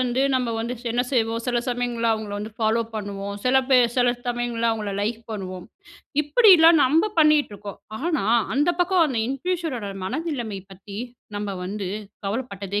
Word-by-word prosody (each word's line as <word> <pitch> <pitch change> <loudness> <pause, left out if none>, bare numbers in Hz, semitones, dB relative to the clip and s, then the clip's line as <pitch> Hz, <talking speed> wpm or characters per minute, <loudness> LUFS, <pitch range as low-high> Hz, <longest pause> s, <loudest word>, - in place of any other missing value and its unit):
வந்து 250 0 0
நம்ப 250 -2 0
வந்து 235 +2 -3 0.2
என்ன 240 +1 +1
செய்வோம் 230 -3 0
சில 245 -1 0
சமயங்கள்ல 240 -2 -1
அவங்கள 215 -2 -4
வந்து 215 +2 -6
ஃபாலோ 225 +1 +2
பண்ணுவோம், 200 -1 -4
சில 255 +1 +4
பேர் 245 -3 +5
சில 245 -1 +4 0.2
சமயங்கள்ல 240 -1 0
அவங்கள 215 -3 -3
லைக் 220 +3 -1
பண்ணுவோம். 185 -4 -6 0.6
இப்படிலாம் 330 -3 +7
நம்ம 320 +11 +3
பண்ணிட்டு 305 -6 +4
இருக்கோம். 200 -1 -9 0.2
ஆனா, 310 - 0 0.3
அந்த 290 +5 +2
பக்கம் 355 -1 +4
அந்த 260 -6 -2
இன்ஃப்ளூயன்சரோட 275 - -3
மனநிலைமை 245 - -3
பத்தி, 195 +1 -11 0.4
நம்ப 205 0 -3
வந்து 195 0 -4 0.4
கவலைப்பட்டதே 200 -3 -3
240 Hz, 150 wpm, -24 LUFS, 210-275 Hz, 0.6 s, இப்படிலாம்